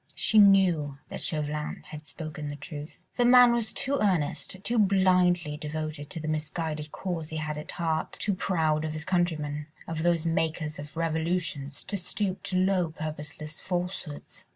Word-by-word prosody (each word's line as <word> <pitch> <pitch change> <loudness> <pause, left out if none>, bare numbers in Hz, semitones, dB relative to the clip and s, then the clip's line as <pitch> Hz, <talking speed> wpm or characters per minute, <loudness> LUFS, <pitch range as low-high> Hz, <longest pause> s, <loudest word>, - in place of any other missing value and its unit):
She 220 - +4
knew 180 -8 +5
that - - -6
Chauvelin 150 -1 -2
had 155 0 -9
spoken 155 -2 -6
the 145 - -4
truth; 145 +1 -8 0.2
the 245 - +4
man 245 0 +8
was 235 -2 0
too 280 +2 0
earnest, 185 -3 0
too 235 +1 +1
blindly 180 -5 +3
devoted 155 -1 -4
to 165 - -3
the 155 - -5
misguided 155 0 -2
cause 170 -5 -4
he 160 - -4
had 155 -1 -2
at 150 - -7
heart, 160 -2 -1
too 205 - -1
proud 160 -5 +1
of 155 -1 -2
his 155 0 -5
countrymen, 155 -5 0 0.2
of 160 -1 -3
those 170 -1 +2
makers 160 -2 -1
of 150 +2 -9
revolutions, 160 -3 -1
to 200 +1 -3
stoop 190 +1 -2
to 185 - 0
low, 185 -2 +2
purposeless 155 0 -6
falsehoods. 180 -4 -4
160 Hz, 165 wpm, -28 LUFS, 150-185 Hz, 0.2 s, man